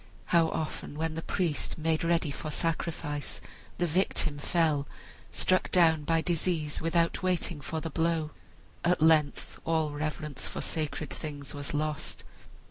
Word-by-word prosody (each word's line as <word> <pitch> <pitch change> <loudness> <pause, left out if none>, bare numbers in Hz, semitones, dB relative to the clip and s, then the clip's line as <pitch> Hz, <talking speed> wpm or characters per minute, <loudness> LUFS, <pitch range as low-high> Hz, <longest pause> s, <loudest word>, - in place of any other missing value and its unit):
How 165 -1 +6
often, 155 -2 -4
while 160 +1 0
the 160 +1 -4
priest 170 -3 -1
made 160 0 +1
ready 165 -3 +2
for 155 - -5
sacrifice, 160 -2 -2 0.4
the 175 - +2
victim 160 -3 +1
fell, 150 -2 +2 0.4
struck 185 0 +2
down 160 -4 +4
by 165 +1 +3
disease 165 -3 0
without 165 +1 +2
waiting 180 -4 0
for 160 +3 -3
the 165 - -4
blow! 160 -1 +1 0.5
At 175 +1 +3
length 155 -3 +3
all 160 -2 +1
reverence 150 -1 -3
for - - -5
sacred 155 -2 -2
things 145 -1 -5
was 145 0 -4
lost. 150 0 -2
160 Hz, 140 wpm, -30 LUFS, 150-165 Hz, 0.5 s, How